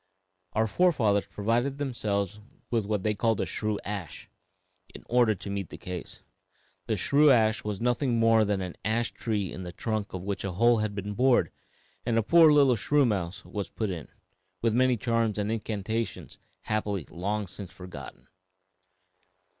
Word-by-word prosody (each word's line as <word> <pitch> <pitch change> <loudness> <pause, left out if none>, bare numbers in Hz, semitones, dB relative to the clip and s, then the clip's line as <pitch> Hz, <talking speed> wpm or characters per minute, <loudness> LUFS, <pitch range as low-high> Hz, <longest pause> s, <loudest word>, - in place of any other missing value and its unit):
Our 110 +1 +2
forefathers 110 - +2
provided 120 +6 0
themselves 105 -7 -2 0.3
with 115 -4 0
what 105 -3 -1
they 110 - +1
called 110 0 +1
a - - +1
shrew 105 -1 -2
ash, 100 -6 -6 0.6
in - - -10
order 120 -3 +3
to 100 - -8
meet 100 -4 -3
the - - -9
case. 90 -2 -7 0.7
The - - 0
shrew 150 +1 +4
ash 110 -4 +4
was 105 -2 -3
nothing 125 +1 +1
more 115 -1 +5
than 100 -2 0
an 90 -2 -6
ash 115 +2 0
tree 105 -6 -2
in 95 - -7
the 90 -1 -6
trunk 110 +3 -3
of 90 -1 -5
which 100 0 -3
a 100 -2 -3
hole 120 +5 +4
had 105 -1 -2
been 100 +1 -4
bored 125 +3 +3 0.5
and 115 -1 0
a 115 - +3
poor 165 +5 +7
little 140 -4 +5
shrew 145 +6 +2
mouse 100 -2 -2 0.3
put 110 -3 -1
in, 85 -5 -6 0.5
with 115 -1 +1
many 125 +1 +3
charms 115 -2 0
and 105 +1 -1
incantations 110 0 -3 0.2
happily 105 -6 -2
long 100 +4 -2
since 95 0 -8
forgotten." 90 0 -10
110 Hz, 165 wpm, -28 LUFS, 100-120 Hz, 0.7 s, poor